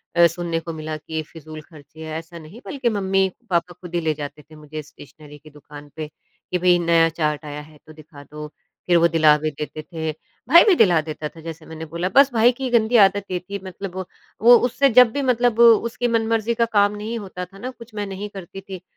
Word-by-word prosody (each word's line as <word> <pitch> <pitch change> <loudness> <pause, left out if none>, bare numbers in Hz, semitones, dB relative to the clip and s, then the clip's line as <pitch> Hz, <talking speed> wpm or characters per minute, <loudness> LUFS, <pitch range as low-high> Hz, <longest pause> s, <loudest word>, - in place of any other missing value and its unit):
अ, 170 0 +6
सुनने 170 0 -3
को 165 0 -7
मिला 155 0 -5
कि 160 +1 -5
फ़िजूल 155 0 -11
खर्चे 155 -1 -17
हैं, 155 0 -5
ऐसा 165 +1 -12
नहीं। 165 +8 -13
बल्कि 265 -4 -2
मम्मी-पापा 190 -2 -1
खुद 175 0 -13
ही - - +2
ले 160 -1 0
जाते 145 0 -8
थे 155 +1 -18
मुझे 155 0 -8
स्टेशनरी 150 0 -15
की 155 +1 -17
दुकान 145 0 -13
पे, 155 -1 -5 0.4
कि 180 - +1
भई 180 0 +4
नया 165 -1 +3
चार्ट 155 -2 -2
आया 150 0 -6
है 150 0 -16
तो 155 - -12
दिखा 150 -2 -14
दो, 150 +2 -9 0.4
फिर 175 -1 +4
वो 170 0 +5
दिला 155 -2 +4
भी 155 +1 -3
देते 150 +1 -7
थे। 160 0 -5 0.4
भाई 340 +5 +8
भी 395 - +6
दिला 175 - +4
देता 155 -1 -6
था 165 - -15
जैसे 165 0 -9
मैंने 160 0 -8
बोला। 170 +3 -3
बस 275 0 +6
भाई 235 +1 +5
की 260 +1 -5
गंदी 235 0 +2
आदत 200 +1 -1
ये 180 - -1
थी 200 +3 -7
मतलब 185 0 -8
वो 190 0 -4 0.4
वो 240 +2 +8
उससे 275 +3 +2
जब 250 -1 +6
भी 285 - -2
मतलब 245 -3 +1
उसकी 235 +1 +4
मनमर्जी 225 -1 0
का 230 0 +2
काम 205 0 +3
नहीं 215 +3 -5
होता 185 -3 -7
था 195 +2 -17
ना, 245 +6 -6
कुछ 235 -2 -15
मैं 205 -1 -3
नहीं 195 +2 -6
करती 195 -1 -10
थी, 190 -2 -9
175 Hz, 230 wpm, -21 LUFS, 155-215 Hz, 0.4 s, भाई